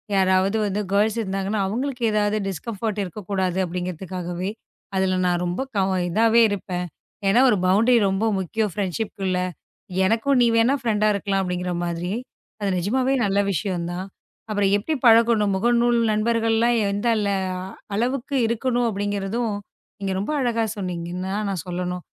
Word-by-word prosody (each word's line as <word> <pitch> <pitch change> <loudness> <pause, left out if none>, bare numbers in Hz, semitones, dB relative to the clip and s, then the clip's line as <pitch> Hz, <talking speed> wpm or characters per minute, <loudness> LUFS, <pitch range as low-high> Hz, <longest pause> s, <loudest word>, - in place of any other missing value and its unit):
யாராவது 190 +2 +3
வந்து 205 0 -1
கேர்ள்ஸ் 210 +2 +2
இருந்தாங்கன்னா 195 +1 -2
அவங்களுக்கு 245 +4 -3
ஏதாவது 210 0 +1
டிஸ்கம்ஃபர்ட் 210 +3 -3
இருக்க 190 +2 -7
கூடாது 190 -2 0
அப்படிங்கறதுக்காகவே 180 +1 -4 0.5
அதுல 190 -1 +1
நான் 175 -1 +1
ரொம்ப 175 +7 -2
கவ 195 -1 +2 0.2
இதாவே 225 +5 +4
இருப்பேன். 180 -2 -3 0.4
ஏன்னா 195 +5 +4
ஒரு 210 - +3
பவுண்டரி 225 +6 +4
ரொம்ப 195 +3 0
முக்கியம். 210 +3 -1
ப்ரெண்ட்ஷிப்குள்ள 195 -1 -2 0.7
எனக்கும் 230 +7 +2
நீ - - +6
வேணா 230 +4 +4
ஃப்ரெண்ட் 215 -3 +1
இருக்கலாம் 200 -1 0
அப்படிங்கிற 180 0 -2
மாதிரி. 170 +1 -3 0.5
அது 205 -1 -1
நிஜமாவே 255 +9 +1
நல்ல 200 0 +1
விஷயம் 180 -1 -2
தான். 180 +2 -4 0.4
அப்புறம் 205 -2 +1
எப்படி 220 +10 -2
பழக்கணும்? 225 -3 +5
முகநூல் 240 +3 +3
நண்பர்கள் 225 +1 +1
எல்லாம் 235 +1 +3
இருந்தாலும் 200 -2 0 0.5
அளவுக்கு 255 +5 -1
இருக்கணும் 240 +1 0
அப்படிங்கறதும் 205 +2 -2 0.5
இங்க 195 -1 -1
ரொம்ப 205 - -2
அழகா 235 -2 +1
சொன்னீங்க. 175 -3 -4 0.4
நான் 185 -4 -2
சொல்லணும் 180 0 -3
200 Hz, 135 wpm, -23 LUFS, 185-230 Hz, 0.7 s, நீ